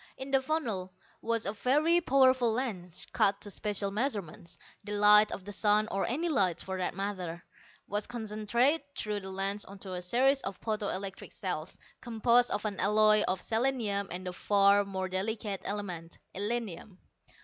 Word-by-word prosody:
In 265 +1 -7
the 270 -1 +4
funnel 230 -12 -2 0.3
was 230 -1 -1
a 200 - -1
very 300 +10 +2
powerful 260 -5 +4
lens, 190 -8 -4
cut 200 -3 +2
to 205 - -1
special 200 -1 0
measurements. 200 - -3 0.3
The 205 0 -6
light 210 +1 +6
of 185 - -6
the 205 - -6
sun, 210 +1 +2
or 195 - -1
any 310 +8 -1
light, 190 - +1
for 190 - -5
that 180 - -2
matter, 185 -4 -4 0.4
was 205 +1 -2
concentrated 235 +6 0 0.2
through 210 -1 -1
the 190 -1 -8
lens 195 +2 -2
onto 195 -1 -10
a 180 - -4
series 260 +9 +2
of 195 -1 -5
photo 215 -2 -3
electric 195 0 -5
cells, - - -4 0.2
composed 240 +1 +3
of 205 - -2
an 205 -2 -3
alloy 215 +2 +5
of 185 - 0
selenium 225 -4 0
and 180 +2 -5
the 180 - -4
far 200 +1 +3
more 190 -1 -3
delicate 200 +1 -2
element, 180 -5 -5 0.2
illinium. 205 -2 -4
205 Hz, 165 wpm, -30 LUFS, 195-235 Hz, 0.4 s, light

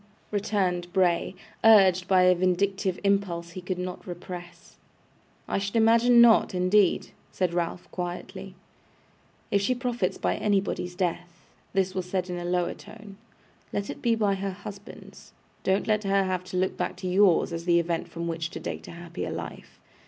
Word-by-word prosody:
returned 190 -4 -1
Bray, 180 -1 +1 0.3
urged 190 -5 +6
by 185 -1 +5
a 180 0 +6
vindictive 185 +1 0
impulse 190 -4 0
he 185 - -7
could 180 0 -3
not 180 0 -6
repress. 175 0 -9 0.7
'I - - 0
should 200 +2 -4
imagine 230 +2 +5
not, 230 -5 +6
indeed!' 185 +1 +3 0.2
said 180 -2 -1
Ralph, 175 +1 -2
quietly. 185 +2 -6 1.0
'If 200 - +3
she 255 +6 +1
profits 245 -6 -2
by - - -1
anybody's 195 -3 -1
death,' 175 -1 -3 0.3
this 190 -1 +1
was 185 -1 -4
said 185 -1 -2
in 175 - -3
a 175 - -5
lower 175 0 0
tone, 210 -2 -13 0.5
'let 200 0 -3
it - - -10
be 235 -1 +2
by 210 -3 +1
her 195 0 -3
husband's. 200 +2 -11 0.3
Don't 190 +1 +1
let 215 -1 +1
her 195 0 +2
have 185 -1 -2
to 185 0 -5
look 185 +1 0
back - - -3
to 185 - -6
yours, 180 -2 +3
as 165 0 -5
the 170 -1 +4
event 170 -1 -2
from 170 0 -5
which 165 0 -3
to - - -7
date - - -6
a - - -8
happier 170 0 -6
life. - - -8
185 Hz, 170 wpm, -26 LUFS, 175-200 Hz, 1.0 s, urged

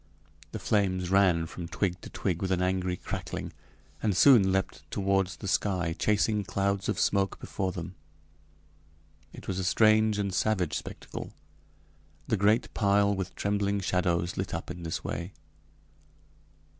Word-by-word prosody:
The - - -4
flames 95 -3 0
ran 90 -4 +4
from 85 +1 -7
twig 90 +1 -2
to - - -9
twig 90 -4 -2
with 95 -1 -1
an 90 -1 +1
angry 90 -1 0
crackling, - - -5 0.5
and 105 -4 +1
soon 115 -9 +7
leaped 95 0 -1
toward 95 -1 +1
the 90 +2 -8
sky, 90 -4 0
chasing 105 +2 +1
clouds 100 +1 -1
of - - -1
smoke 100 -1 +1
before 95 -1 -3
them. 85 0 -6 1.4
It - - -12
was 95 -1 -2
a - - -1
strange 110 +2 +4
and 100 -2 -1
savage 95 -4 +1
spectacle, - - -7 0.9
the - - +2
great 105 +3 +2
pile 100 -1 +3
with 95 -2 -4
trembling 100 0 0
shadows 90 -2 0
lit 95 -2 -2
up 85 - -5
in 90 0 -8
this 80 -1 -4
way. 85 +5 -4
95 Hz, 145 wpm, -29 LUFS, 90-100 Hz, 1.4 s, soon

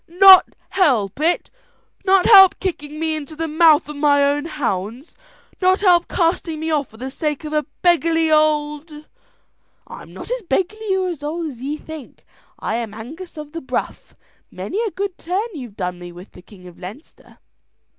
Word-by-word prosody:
"Not 375 +2 +7
help 245 - +1
it! 335 +9 0 0.5
Not 380 -1 +3
help 385 -4 +8
kicking 305 -5 -5
me 320 -1 -1
into 310 0 -7
the 325 +1 -3
mouth 315 -1 +4
of 300 - -7
my 285 -1 +3
own 290 +1 0
hounds! 240 - -4 0.5
Not 370 +1 +3
help 355 -3 +4
casting 330 -2 -1
me 320 +1 -3
off 290 -4 0
for 220 - -18
the 260 +3 -6
sake 300 +1 -3
of 305 0 -6
a 300 -1 0 0.2
beggarly 330 -2 +2
old 300 0 +1 0.6
" - - -46
"I'm - - -11
not - - -9
as - - -2
beggarly 385 +4 -1
or 375 -1 -1
as 330 -5 -6
old 320 +3 -4
as 245 -4 -12
ye 285 +3 -3
think. 315 -3 -11 0.3
I 220 - -3
am 225 -3 -5
Angus 315 +11 -10
of 300 -1 -8
the 330 +1 -6
Bruff; 265 - -5 0.3
many 415 - -4
a 455 - -1
good 390 -1 -5
turn 385 +7 -2
you've 245 - -9
done 180 -2 -4
me 175 0 -9
with 175 +3 -13
the - - -15
King 185 0 -17
of 175 -1 -14
Leinster. 205 - -12
310 Hz, 185 wpm, -20 LUFS, 275-355 Hz, 0.6 s, help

